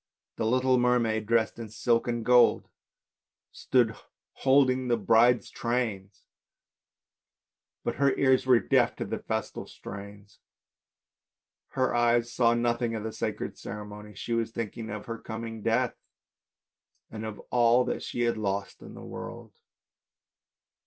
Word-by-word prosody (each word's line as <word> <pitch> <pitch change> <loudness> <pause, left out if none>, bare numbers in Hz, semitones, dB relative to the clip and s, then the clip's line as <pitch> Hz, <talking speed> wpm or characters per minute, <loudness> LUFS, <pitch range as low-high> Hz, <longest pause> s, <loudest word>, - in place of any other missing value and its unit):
The 110 - 0
little 130 +1 +3
mermaid 115 -3 +1
dressed 115 0 +1
in 115 -2 -6
silk 115 +2 +1
and 120 -2 -2
gold 125 0 +5 0.8
stood 120 -4 +1 0.4
holding 130 -1 +3
the 120 -1 +2
bride's 115 +3 +3
THE - - -14
MERMAID 120 0 0 0.2
19 100 -2 -7
train, - - -39 1.7
but - - -2
her 140 -1 +3
ears 130 -1 +3
were 125 -2 +6
deaf - - +2
to - - -4
the - - -4
festal - - -4
strains, 100 0 -11 1.3
her 130 -1 +1
eyes 120 0 +2
saw 120 -1 +3
nothing 120 0 0
of 110 - -4
the 110 0 -4
sacred - - -4
ceremony, 105 0 -8
she 115 - -4
was 115 -1 0
thinking 115 0 -5
of 105 0 -6
her 115 -1 -6
coming 115 0 -6
death 115 +3 +1 1.2
and 110 -1 -6
of 110 -1 -5
all 120 +1 +4
that - - -3
she 120 - -4
had 120 -1 +1
lost 100 -1 -3
in - - -11
this - - -10
world. - - -8
115 Hz, 145 wpm, -28 LUFS, 110-125 Hz, 1.7 s, were